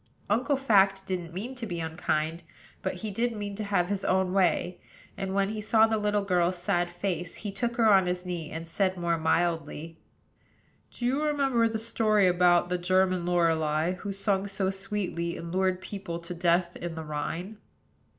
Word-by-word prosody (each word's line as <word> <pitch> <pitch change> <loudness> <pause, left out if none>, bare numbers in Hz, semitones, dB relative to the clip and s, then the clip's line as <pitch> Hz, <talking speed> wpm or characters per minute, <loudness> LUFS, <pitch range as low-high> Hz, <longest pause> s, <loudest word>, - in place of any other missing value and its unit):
Uncle 255 +7 +2
Fact 195 -7 +3
didn't 175 -3 -3
mean 210 +9 -5
to 245 -3 -6
be 175 -3 -4
unkind, 160 0 -1 0.4
but - - -2
he 215 - -3
did 235 +4 0
mean 205 -1 -4
to 215 +2 -4
have 195 -4 +1
his 200 -1 -1
own 185 0 +1
way; 185 -1 +1 0.3
and, 195 0 -3
when 195 0 +2
he 215 0 -4
saw 220 +1 +5
the 220 -1 0
little 210 -1 +1
girl's 180 -2 +1
sad 175 -1 0
face, 175 -1 -3
he 205 - -5
took 235 +4 -2
her 230 -2 +3
on 190 -2 +5
his 180 0 -2
knee, 175 -3 -4
and 165 +1 -6
said, 185 +2 0
more 170 -1 0
mildly: 165 -1 -1 0.9
"Do 240 - -6
you 265 +4 +1
remember 275 -6 +2
the 220 - -2
story 220 -2 +2
about 175 -1 +4
the 180 0 -1
German 185 0 +2
Lorelei, 160 -2 +2
who 200 +2 -5
sung 195 0 0
so 195 -1 -1
sweetly, 195 -3 -3
and 170 0 -7
lured 185 0 +1
people 195 -4 -5
to 170 +1 -7
death 175 0 +1
in 170 -1 -5
the 160 - -5
Rhine?" 165 +7 -4
185 Hz, 185 wpm, -28 LUFS, 175-205 Hz, 0.9 s, saw